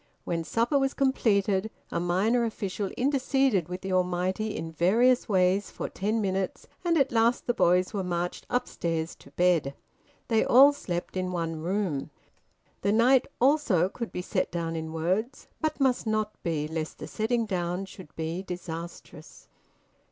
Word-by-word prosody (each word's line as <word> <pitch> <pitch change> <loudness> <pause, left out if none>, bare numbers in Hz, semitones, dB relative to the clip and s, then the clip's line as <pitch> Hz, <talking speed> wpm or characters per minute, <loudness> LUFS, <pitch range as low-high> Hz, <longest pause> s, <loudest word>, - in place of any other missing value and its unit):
When 165 -1 -2
supper 235 - +1
was 270 0 0
completed, 215 -6 +2 0.2
a - - -1
minor 195 +8 +2
official 205 -3 -3
interceded 265 - +1
with 180 +1 -5
the 190 0 -3
Almighty 185 +4 0
in 165 0 -5
various 225 +11 +3
ways 190 0 +2
for - - -5
ten 215 +4 -1
minutes, 190 -2 -2 0.2
and 340 -2 +2
at 270 -2 +2
last 230 +1 +2
the 240 - +1
boys 180 -3 +3
were 200 -2 -1
marched 175 0 -3
upstairs 165 -9 -2
to - - -16
bed. 170 -6 +1 0.5
They 225 -2 +3
all 275 +4 +7
slept 175 -11 -4
in 185 0 -1
one 165 -3 -3
room. 175 -5 -1 0.7
The 200 - +1
night 245 +4 +4
also 250 - +3
could 235 +3 -6
be 180 - -4
set - - -1
down 165 -1 -2
in 160 0 -4
words, 185 +10 -1 0.2
but 310 -1 -1
must 260 -4 +2
not 215 -1 0
be, 155 -3 -1
lest 160 0 -4
the - - -7
setting 230 +1 0
down 180 -1 -2
should 185 -4 -13
be 165 +3 -3
disastrous... 175 -2 -8
190 Hz, 160 wpm, -28 LUFS, 175-235 Hz, 0.7 s, all